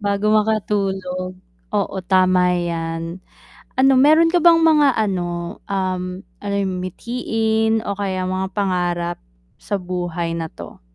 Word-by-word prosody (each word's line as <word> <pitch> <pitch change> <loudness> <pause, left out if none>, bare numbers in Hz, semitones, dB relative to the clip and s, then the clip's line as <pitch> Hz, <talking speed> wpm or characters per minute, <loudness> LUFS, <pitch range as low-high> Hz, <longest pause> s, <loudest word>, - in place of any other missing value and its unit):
Bago 205 +1 +1
makatulog, 195 -4 0 0.4
oo - - 0
tama 185 -1 +4
'yan. 165 0 -3 0.6
Ano 270 +1 +5
meron 315 +4 +5
ka 355 - +3
bang 335 -1 +7
mga 310 -3 +5
ano, 175 -4 -2
um, 185 -2 -1 0.4
ano 200 -1 -2
'yon 190 -2 -1
mithiin 220 +2 -1
o 200 - -1
kaya 190 -2 -2
mga 185 +1 -2
pangarap 175 -3 -1 0.4
sa 205 - -2
buhay 175 -2 -3
na 165 -1 -4
'to? - - -11
190 Hz, 125 wpm, -20 LUFS, 180-215 Hz, 0.6 s, bang